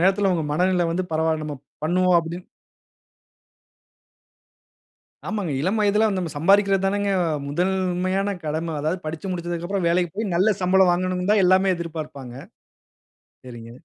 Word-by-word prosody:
நேரத்தில 195 +2 +3
உங்க 165 -3 -1
மனநில 180 +2 +2
வந்து 175 +3 -1
பரவாயில்ல! 160 0 0
நம்ம 150 -2 -5 0.3
பண்ணுவோ 180 +3 +2
அப்டினு 170 +2 -5 2.8
ஆமாங்க. 205 -8 -2
இளம் 190 +8 0
வயதில 210 +1 +3
நம்ம 175 -3 -3
சம்பாதிக்கிறது 195 +4 +3
தானங்க 200 +1 0 0.4
முதல்மையான 185 +4 0
கடம. 160 +2 -3
அதாவது 160 +5 -2
படிச்சு 160 +4 -5
முடிச்சதுக்கப்புறம் 175 +1 -3
வேலைக்கு 175 -1 +1
போய் 210 -3 -2
நல்ல 200 +5 +3
சம்பளம் 185 0 +4
வாங்கணுனு 180 +1 -1
தான் 210 -2 +4
எல்லாமே 185 +1 +4
எதிர்பார்ப்பாங்க. 155 -7 -7 1.1
சரிங்க. 115 -2 -10
180 Hz, 120 wpm, -23 LUFS, 165-190 Hz, 2.8 s, சம்பளம்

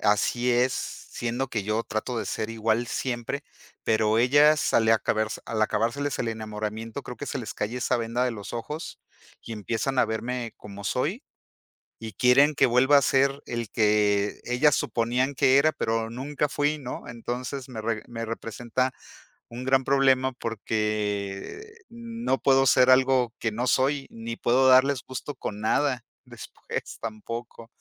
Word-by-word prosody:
Así 110 +4 +2
es, 125 +2 +3
siendo 125 0 -4
que 110 -4 -2
yo 110 +3 -1
trato 115 +2 -3
de - - -3
ser 110 0 -3
igual 115 +1 0
siempre, 120 -3 -3 0.4
pero 110 0 +2
ellas 145 +5 +4
al 110 -1 +4
acabar 110 0 +2 0.2
al 110 -1 -1
acabárseles 115 +7 0
el 120 - -1
enamoramiento, 110 +2 -5
creo 125 0 -8
que - - -6
se - - -3
les 115 -4 -6
cae 110 +4 -3
esa 125 0 +1
venda 115 +2 -1
de 125 - +1
los 100 -3 -8
ojos, 150 +7 -6 0.4
y 115 - -8
empiezan 115 +5 -2
a - - +6
verme 115 +1 -3
como 100 -1 -10
soy, 170 - -1 0.8
y 110 -2 -6
quieren 140 +7 +5
que 135 - +5
vuelva 130 +4 +5
a - - +1
ser 135 +1 +2
el 120 -2 -4
que 105 -2 +2
ellas 135 +4 +3
suponían 125 +4 0
que 130 +1 +4
era, 155 +3 +4
pero 115 -3 -1
nunca 140 +4 -2
fui, 145 +2 0
¿no? 130 -3 -7
Entonces 125 +3 -5
me 115 -3 -6
re 110 -1 -2
me 115 -1 -5
representa 115 +3 -2 0.6
un 120 +2 -7
gran 130 0 +3
problema, 135 -1 +3
porque 105 - -3 0.2
no 235 - -3
puedo 135 -1 +4
ser 130 0 +5
algo 130 -2 +4
que 110 - 0
no 120 +4 -2
soy, 135 +2 +2
ni 115 0 -6
puedo 130 +3 +3
darles 130 0 +5
gusto 130 +2 -6
con 105 -4 -6
nada 125 +2 +1 0.2
después - - -7
tampoco. 115 +1 -7
120 Hz, 160 wpm, -26 LUFS, 110-130 Hz, 0.8 s, a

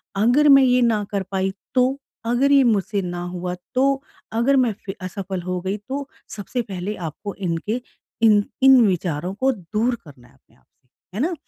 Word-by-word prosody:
अगर 245 +9 +4
मैं 275 -1 +8
ये 250 -1 +4
ना 225 -3 +2
कर 200 -1 -1
पाई 190 0 -1 0.2
तो? 255 +2 +3 0.3
अगर 245 +4 +2
ये 280 -1 +6
मुझसे 210 -3 +1
ना 175 -1 -4
हुआ 180 0 -4 0.2
तो? 270 +1 +2 0.3
अगर 235 +5 +2
मैं 250 -5 +3
फ़ि 195 - -4
असफ़ल 185 0 -5
हो 180 +1 -3
गई 190 +2 -2
तो? 270 +7 -6 0.3
सबसे 230 +4 -3
पहले 200 -1 -5
आपको 180 +4 -6
इनके 195 +6 -2 0.4
इन 210 -2 +6 0.2
इन 265 -1 +8
विचारों 175 -1 -2
को 260 +6 +1
दूर 215 +3 -1
करना 130 -5 -15
है - - -24
अपने - - -30
आप 65 - -31
से, 125 - -44 0.3
है - - 0
ना? 340 +5 0
210 Hz, 190 wpm, -22 LUFS, 185-250 Hz, 0.4 s, मैं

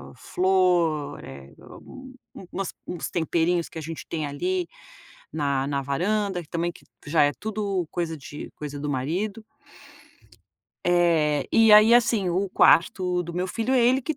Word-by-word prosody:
flor, 180 -5 +1
eh, 70 0 -11
u 260 0 -13 0.2
u 185 - -11
umas 195 0 -4
uns 175 - -5
temperinhos 170 +1 0
que - - -11
a - - -4
gente 160 +1 -8
tem 155 -2 -3
ali 355 - -2 0.6
na 140 -3 -1
na 140 -1 -1
varanda, 190 +6 -1
que 155 - -17
também 170 +1 -2
que - - -18 0.2
já 150 +1 +2
é 145 - +3
tudo 200 -5 -2
coisa 165 -2 -3
de 145 +1 -9
coisa 145 -1 -7
do 145 0 -4
marido. 180 - -3 1.4
Eh, 165 -5 +2
e 225 -1 +6
aí 215 +2 +8
assim, 225 -5 +3
o 190 +3 0
quarto 180 +1 +3
do 170 0 -8
meu 180 +1 -1
filho, 230 +7 -1
é 250 - +4
ele 255 +2 +3
que 310 +4 -4
175 Hz, 160 wpm, -25 LUFS, 150-200 Hz, 1.4 s, aí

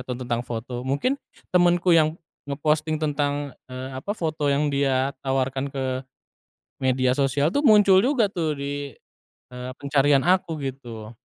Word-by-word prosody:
atau 125 - -4
tentang 120 -2 -2
foto 120 +1 -5
mungkin 140 - 0 0.4
temenku 175 0 +4
yang 155 0 +3 0.3
nge-posting 155 +2 0
tentang, 145 -2 -1 0.2
eee, 130 +1 -6
apa 135 +10 -6
foto 155 -4 -1
yang 145 +1 +1
dia 135 -1 +1
tawarkan 135 0 -1
ke 135 -1 -4 1.0
media 130 -1 +2
sosial 140 +2 +2
tuh 285 - +1
muncul 205 -5 +7
juga 245 -2 +2
tuh 160 -5 -1
di, 140 -1 -5 0.6
eee, 125 0 -6
pencarian 140 -1 +3
aku 180 -3 +2
gitu. 120 -5 -7
140 Hz, 140 wpm, -24 LUFS, 130-155 Hz, 1.0 s, muncul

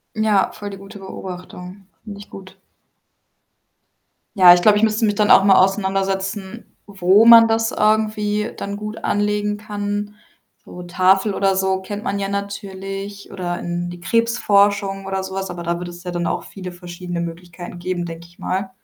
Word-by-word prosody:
Ja, 215 -3 +2
voll 205 -1 -7
die 195 - -8
gute 195 +1 -12
Beobachtung. 185 0 -9 0.2
Finde 205 -2 -8
ich 200 - -12
gut. 190 0 -12 1.8
Ja, 180 -2 +9
ich 175 - 0
glaube, 210 +2 +5
ich 215 - +3
müsste 220 +1 +1
mich 205 -1 +2
dann 210 0 +1
auch - - +8
mal 195 -1 +6
auseinandersetzen, 195 +2 -1
wo 195 +1 +4
man 230 -1 +9
das 225 0 +1
irgendwie 215 0 0
dann 200 0 -5
gut 210 +1 -6
anlegen 210 0 0
kann. 205 0 -4 0.5
So 180 - -10
Tafel 190 +3 +2
oder 195 -1 +1
so 190 0 0
kennt 205 +2 -6
man 200 -4 -2
ja 195 -1 -2
natürlich 200 0 -6
oder 175 -2 -4
in 175 0 -4
die 175 0 -10
Krebsforschung 205 -3 +1
oder 190 0 -3
so 190 0 -7
was, 195 -1 -4
aber 175 -1 -6
da 170 0 -2
wird 175 0 -6
es 175 +1 -11
ja 180 - -4
dann 175 -1 -2
auch - - -2
viele 185 -2 -9
verschiedene 175 0 -6
Möglichkeiten 175 +1 -8
geben, 175 0 -3
denke 170 0 -8
ich 175 - -24
mal. 190 +1 -3
195 Hz, 175 wpm, -20 LUFS, 180-205 Hz, 1.8 s, Ja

